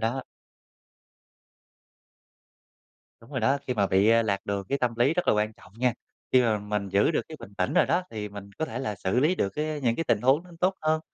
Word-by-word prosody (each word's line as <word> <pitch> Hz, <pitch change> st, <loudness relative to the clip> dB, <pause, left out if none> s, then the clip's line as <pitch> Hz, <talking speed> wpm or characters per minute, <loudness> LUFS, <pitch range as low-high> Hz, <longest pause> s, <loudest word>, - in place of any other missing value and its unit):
đó. 120 Hz, +4 st, -1 dB, 3.0 s
Đúng 115 Hz, -, -17 dB
rồi 130 Hz, -3 st, -2 dB
đó, 135 Hz, +5 st, +2 dB
khi 125 Hz, -, -1 dB
mà 100 Hz, -2 st, +2 dB
bị, 95 Hz, +2 st, +3 dB
à, 115 Hz, 0 st, +5 dB
lạc 100 Hz, -3 st, -2 dB
đường 100 Hz, -1 st, -2 dB
cái 140 Hz, -, 0 dB
tâm 120 Hz, -2 st, 0 dB
lý 130 Hz, +7 st, +3 dB
rất 180 Hz, -, -1 dB
là -, -, +6 dB
quan 105 Hz, +1 st, 0 dB
trọng -, -, -18 dB
nha. 125 Hz, -1 st, +2 dB, 0.4 s
Khi 130 Hz, -1 st, +6 dB
mà 110 Hz, -3 st, +2 dB
mình 105 Hz, -1 st, -3 dB
giữ 100 Hz, -, +3 dB
được -, -, +1 dB
cái 155 Hz, -, -8 dB
bình 100 Hz, -, -11 dB
tĩnh 90 Hz, -, 0 dB
rồi -, -, +5 dB
đó 175 Hz, +2 st, +2 dB
thì 105 Hz, -2 st, -5 dB
mình 100 Hz, 0 st, -10 dB
có 160 Hz, -, 0 dB
thể 125 Hz, -5 st, -5 dB
là 120 Hz, -6 st, -3 dB
xử 95 Hz, +5 st, 0 dB
lý 155 Hz, +6 st, +3 dB
được 100 Hz, -, 0 dB
cái 150 Hz, +6 st, -3 dB
những 120 Hz, -3 st, +1 dB
cái 165 Hz, -, -1 dB
tình -, -, +2 dB
huống 135 Hz, +6 st, +3 dB
nó 180 Hz, -, -15 dB
tốt 185 Hz, +1 st, +2 dB
hơn. 155 Hz, 0 st, +2 dB
115 Hz, 235 wpm, -27 LUFS, 105-145 Hz, 3.0 s, là